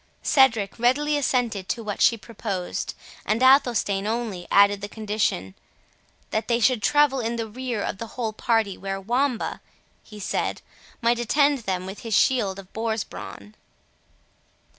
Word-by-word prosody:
Cedric 230 -7 +3
readily 290 +5 +2
assented 245 -8 0
to 230 - -2
what 205 -2 -4
she 230 - +5
proposed, 200 -5 -4 0.3
and 220 +4 0
Athelstane 235 -7 +4
only 220 -6 -3
added 200 0 +5
the 205 - -5
condition, 210 - -2 0.8
"that 220 - -1
they 235 -1 +2
should 245 -1 +3
travel 290 +2 +3
in 230 0 -2
the 230 -1 -2
rear 240 -1 -4
of 195 - -4
the 230 - -5
whole 225 -3 -2
party, 220 -3 0
where 195 0 -4
Wamba," 245 +4 -1 0.4
he 210 -2 -13
said, - - -2 0.4
"might 235 +1 +3
attend 280 +4 +2
them 185 -5 -3
with 190 +2 -7
his 225 -3 -2
shield 210 -7 +2
of 195 -1 -12
boar's 220 -1 -1
brawn." 100 +1 -10
225 Hz, 150 wpm, -24 LUFS, 200-245 Hz, 0.8 s, she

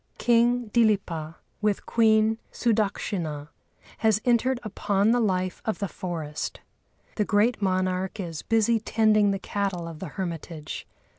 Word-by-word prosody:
King 240 -1 +2
Dilipa, 190 -9 +1 0.3
with 210 -2 0
Queen 220 -1 +3
Sudakshinâ, 195 -9 -1 0.5
has 220 -2 +3
entered 245 +1 +2
upon 205 0 +1
the 245 - +3
life 185 -4 0
of 220 - -1
the 200 - -2
forest. 160 -5 -5 0.6
The 210 - +3
great 215 +3 +2
monarch 185 +1 0
is 165 -5 -4
busy 225 0 +2
tending 215 -1 +3
the 195 - 0
cattle 195 -3 -3
of 165 -2 -8
the 190 - -5
hermitage. 165 -4 -5
205 Hz, 130 wpm, -26 LUFS, 180-225 Hz, 0.6 s, Queen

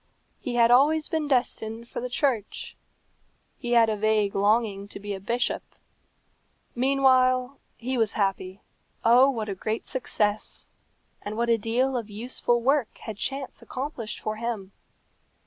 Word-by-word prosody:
He 245 - -4
had 235 0 +5
always 300 +5 +4
been 315 -2 -1
destined 235 -3 0
for - - -5
the 250 - -4
church. 245 -4 -1 0.8
He 240 0 -2
had 230 -1 +6
a 220 - 0
vague 210 -1 +1
longing 205 -1 +1
to - - -8
be 205 0 -5
a 195 - -5
bishop. 235 +6 -1 1.1
Meanwhile 255 0 +3 0.2
he 255 +1 -2
was 220 -2 +1
happy. 195 -1 -2 0.4
Oh, 245 +4 +7
what 225 -5 -2
a 200 - -2
great 215 +4 -3
success! 215 -4 -2 0.5
and 210 +1 -5
what 235 0 0
a 230 - +4
deal 250 +5 +1
of 230 -3 -3
useful 240 +2 0
work 270 -2 +1
had 220 -3 -7
chance 270 +3 -4
accomplished 255 -5 -5
for 215 0 -3
him! 220 -4 -4
235 Hz, 145 wpm, -26 LUFS, 215-255 Hz, 1.1 s, Oh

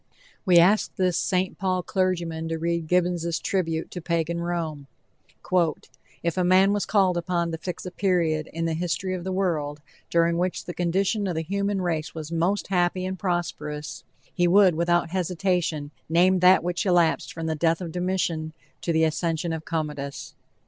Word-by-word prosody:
We 180 -2 +6
ask 190 +5 +4
this 185 -2 +1
St. 185 +1 0
Paul 185 -2 0
clergyman 170 -4 -1
to 165 0 -2
read 170 0 -1
Gibbons' 175 -1 +1
tribute 165 -4 -2
to 180 - -6
Pagan 170 0 -1
Rome: 165 -5 -3 1.4
"If 170 0 -1
a 180 - +2
man 190 +2 +5
was 205 - -1
called 190 -4 +3
upon 170 -1 -1
to 160 - -4
fix 180 +2 -6
a 180 - -5
period 170 -6 +1
in 165 +1 -3
the 165 - 0
history 175 +3 -2
of 180 -2 -4
the 190 - -3
world 160 -6 -1 0.3
during 170 0 +2
which 180 0 -2
the 175 - -5
condition 195 +4 0
of 180 - -2
the 160 - -1
human 200 +2 -1
race 165 -3 -2
was 160 0 -6
most 175 +5 0
happy 185 0 +1
and 190 0 -4
prosperous, 170 -5 -3 0.3
he 175 -1 +2
would 190 0 +6
without 170 0 +1
hesitation 180 -4 -1 0.2
name 180 +3 +4
that 180 0 +6
which 175 0 -1
elapsed 175 -4 +2
from 165 -1 -6
the 160 - 0
death 165 +1 +1
of 175 -3 -5
Domitian 175 -3 -1 0.3
to 170 - -1
the 160 0 +3
accession 165 +1 0
of 160 -1 -5
Commodus." 150 -4 -4
175 Hz, 175 wpm, -25 LUFS, 165-185 Hz, 1.4 s, We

